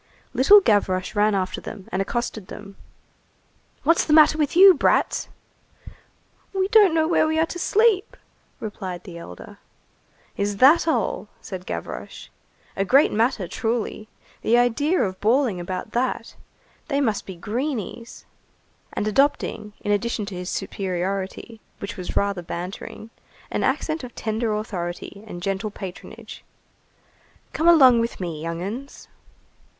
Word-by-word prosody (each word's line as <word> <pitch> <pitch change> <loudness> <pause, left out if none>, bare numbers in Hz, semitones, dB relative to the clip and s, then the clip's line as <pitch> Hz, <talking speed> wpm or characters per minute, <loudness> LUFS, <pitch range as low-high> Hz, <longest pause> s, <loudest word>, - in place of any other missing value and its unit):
Little 400 +11 +7
Gavroche 195 - +1
ran 210 0 +2
after 185 -1 -2
them 200 -4 -9
and 185 - 0
accosted 215 -1 -3
them:— 200 -1 -10 1.1
"What's 330 +1 +4
the 300 - 0
matter 310 0 +7
with 300 0 -1
you, 380 +1 +9
brats?" - - +1 1.2
"We 380 -1 +1
don't 410 -6 +6
know 315 -1 +3
where 325 -2 +3
we 315 0 0
are 320 - +3
to 350 - -7
sleep," 430 0 +2 0.4
replied 185 -4 -6
the 170 -4 -9
elder. 90 - -11 0.8
"Is 200 0 -2
that 295 +8 +6
all?" - - 0
said 185 -2 -8
Gavroche. 85 - -6 0.5
"A 195 - 0
great 265 +9 +4
matter, 225 -3 +1
truly. 225 0 -3 0.3
The 235 - +3
idea 275 +9 +2
of 190 -2 -4
bawling 230 -3 +2
about 185 +4 -5
that. 240 -1 -2 0.5
They 280 -3 0
must 220 -7 -1
be 190 - -7
greenies!" 230 - -5 0.7
And 210 - -2
adopting, 215 -3 0
in 205 - -2
addition 215 +1 0
to 200 -2 -7
his 180 +1 -5
superiority, 195 +3 -4 0.2
which 200 +3 -6
was 185 -3 -6
rather 200 -2 0
bantering, 180 +6 -7 0.4
an - - -1
accent 315 -2 -1
of 245 - -9
tender 220 +1 -2
authority 200 -1 -5
and 175 -4 -8
gentle 195 +2 -2
patronage:— 190 -2 -9 1.1
"Come 325 - 0
along 265 -8 +7
with 230 0 -2
me, 170 -4 -4
young 165 +1 -4
'uns!" 245 +9 -7
215 Hz, 140 wpm, -23 LUFS, 190-280 Hz, 1.2 s, you